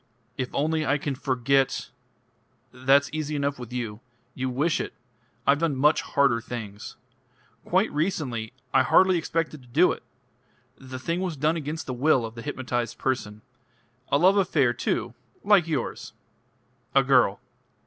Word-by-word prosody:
"If 130 0 -3
only 155 +2 0
I 140 0 +2
can 145 -1 -3
forget 135 0 0 0.4
" - - -41
"That's 140 +1 +5
easy 155 -1 -3
enough 140 -1 -1
with 125 -2 -8
you. 115 -4 -4 0.3
You 130 0 -2
wish 145 +6 0
it. - - -6 0.5
I've 140 +1 +4
done 165 -4 0
much 150 +4 +3
harder 135 -5 +2
things. 110 -4 -7 0.7
Quite - - +2
recently. 145 - -2 0.2
I 135 - +6
hardly 185 +6 +4
expected 160 -2 -2
to 125 - -19
do 155 +10 +4
it: - - -5 0.7
the 130 -1 -9
thing 170 +7 -2
was 180 -5 -3
done 155 +4 +1
against 160 0 -4
the 130 - -4
will 130 -1 +2
of 110 - -7
the 115 - -8
hypnotised 120 0 -3
person. 110 -5 -3 0.7
A - - +3
love 185 +6 +5
affair 150 -10 +2
too - - -2 0.3
like 200 -5 +4
yours. 150 -7 -3 0.8
A - - +6
girl. - - +3
140 Hz, 155 wpm, -26 LUFS, 125-155 Hz, 0.8 s, I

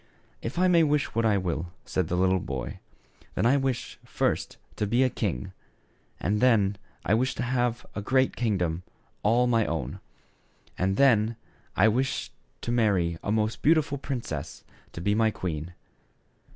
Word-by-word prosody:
"If 115 +8 -5
I 185 +1 +4
may 175 -2 +5
wish 150 -2 +1
what 115 0 +2
I 105 -2 +3
will," 85 -2 -2
said 90 -3 -1
the 90 - -1 0.2
boy, 65 -6 -5 0.3
" - - -30
then - - +1
I 125 +4 +5
wish, 135 -3 -2
first, - - -1 0.2
to 105 - 0
be 120 +5 +3
a 130 - +2
king; 65 -10 -2 0.7
and 105 +3 0
then, 105 -6 +3 0.3
I 95 - +2
wish 125 +3 +1
to - - -2
have 120 -1 0
a 105 - -4
great 130 +5 +2
kingdom, 90 -8 0 0.4
all 115 +4 +3
my 115 -2 +3
own; - - -3 0.8
and 95 +1 0
then, 115 -4 +4 0.4
I - - +5
wish 130 +4 0 0.3
to 120 - -3
marry 95 -8 +2
a 100 - -1
most 110 0 0
beautiful 155 -2 +3
princess 120 - -5 0.3
to 85 - -6
be 100 +3 +2
my 110 +1 +3
queen." 90 -4 -4
110 Hz, 165 wpm, -27 LUFS, 95-125 Hz, 0.8 s, may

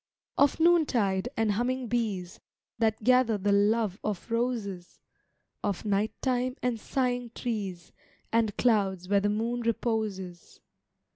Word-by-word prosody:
Of 285 +2 +3
noontide 245 - +3
and 225 -1 +2
humming 245 +4 -1
bees, 205 -6 -2 0.4
That 220 -1 +1
gather 250 -2 +4
the 200 +1 0
love 205 0 +2
of 210 +2 -4
roses; 225 -7 -2 0.6
Of 205 0 -2
night 205 +1 0
time 255 -1 0
and 245 -3 0
sighing 245 -1 -1
trees, 200 -8 -4 0.4
And 225 -3 +1
clouds 195 -6 +2
where 200 0 +3
the 205 - +1
moon 230 +3 -1
reposes. 215 -6 -3
220 Hz, 125 wpm, -28 LUFS, 200-245 Hz, 0.6 s, gather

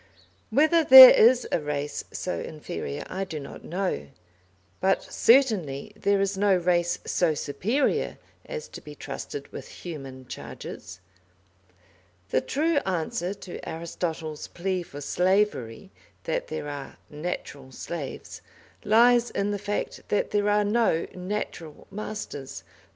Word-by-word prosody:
Whether 315 +7 +4
there 260 -3 +12
is 245 +2 +5
a - - +2
race 150 -1 -3
so 180 - -3
inferior 150 -1 -6
I 190 +1 -3
do 160 -5 -5
not 140 - -10
know, 180 - -3 0.7
but 190 +1 +2
certainly 210 - +2
there 200 -1 +1
is 195 0 0
no 200 0 +3
race 175 -1 +1
so 165 -4 +1
superior 195 - -1 0.3
as 485 -1 -6
to - - -10
be - - -11
trusted 430 - -7
with - - -9
human 135 -6 -9
charges. 90 -5 -9 1.3
The 130 - +2
true 310 - 0
answer 180 - -2
to 190 -3 -9
Aristotle's 160 -1 -4
plea 185 +1 -2
for 145 -4 -9
slavery, 185 - 0 0.3
that - - -2
there 150 - -5
are 145 -2 -7
"natural 150 -4 -6
slaves," 145 +2 -7 0.4
lies 240 +3 +5
in 200 +1 -1
the 205 - -2
fact 205 +1 -4
that 205 - 0
there 205 0 +1
are 210 0 +3
no 210 -6 +2
"natural" 180 -4 -5
masters. 205 -9 -6
185 Hz, 130 wpm, -26 LUFS, 155-210 Hz, 1.3 s, there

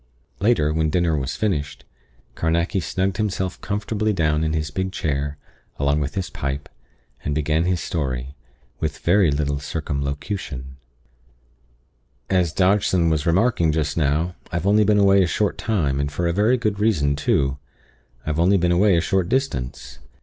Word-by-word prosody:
Later, 100 -8 +2
when 80 0 +1
dinner 85 -1 +1
was 70 -1 -2
finished, 75 -9 -2 0.5
Carnacki 85 +4 0
snugged 95 +3 -1
himself 95 -4 -2
comfortably 105 +1 -1
down 75 -4 +1
in 80 -1 0
his 75 -1 -2
big 95 +4 -2
chair, 75 -4 -2 0.4
along 70 +1 +1
with 75 +7 -3
his 95 -3 -2
pipe, 70 +1 -4 0.5
and 75 - -2
began 75 +2 +1
his 90 -1 +1
story, 65 -6 -3 0.5
with 80 -1 -2
very 90 0 +3
little 70 0 -1
circumlocution: 70 - -4 1.5
"As 90 -4 +2
Dodgson 95 -2 +2
was 75 0 0
remarking 85 -2 +3
just 75 -2 -1
now, 80 +3 +1 0.2
I've 85 +1 -2
only 105 +2 +4
been 105 0 +3
away 100 -1 +5
a 90 - +3
short 105 +3 -1
time, 75 -11 0
and 70 +1 -1
for 85 +4 -2
a 85 - +1
very 110 +7 +3
good 105 -3 -1
reason 75 -10 +2
too 70 - 0 0.7
I've 75 +1 -1
only 95 +4 +4
been 90 -1 +1
away 95 +1 +4
a - - +3
short 95 0 0
distance. 65 - -2
85 Hz, 155 wpm, -22 LUFS, 75-95 Hz, 1.5 s, away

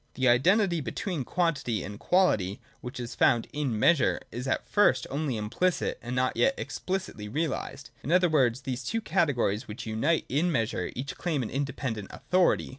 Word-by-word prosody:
The 130 0 +1
identity 170 - +4
between 160 - -3
quantity 135 - -1
and 100 +1 -7
quality, 105 - +2 0.2
which 125 -1 -7
is 120 -1 -5
found 115 -1 +3
in 140 -7 -1
Measure, 140 +4 +3
is 125 +3 -5
at 130 - -1
first 130 -12 +3
only 140 -4 -1
implicit, 125 +13 -1
and 120 +1 -5
not 130 0 +1
yet 270 - +3
explicitly 185 - -4
realised. 145 -1 -3
In 140 - -4
other 180 0 +5
words, 130 -6 +2
these 130 -2 -4
two 225 - -2
categories, 140 - 0
which 105 +2 -7
unite 115 +9 0
in 155 +7 +1
Measure, 115 - -1
each 135 +4 -5
claim 155 -7 -1
an 110 - -5
independent 130 -6 -3
authority. 185 0 +1
135 Hz, 170 wpm, -28 LUFS, 120-170 Hz, 0.2 s, other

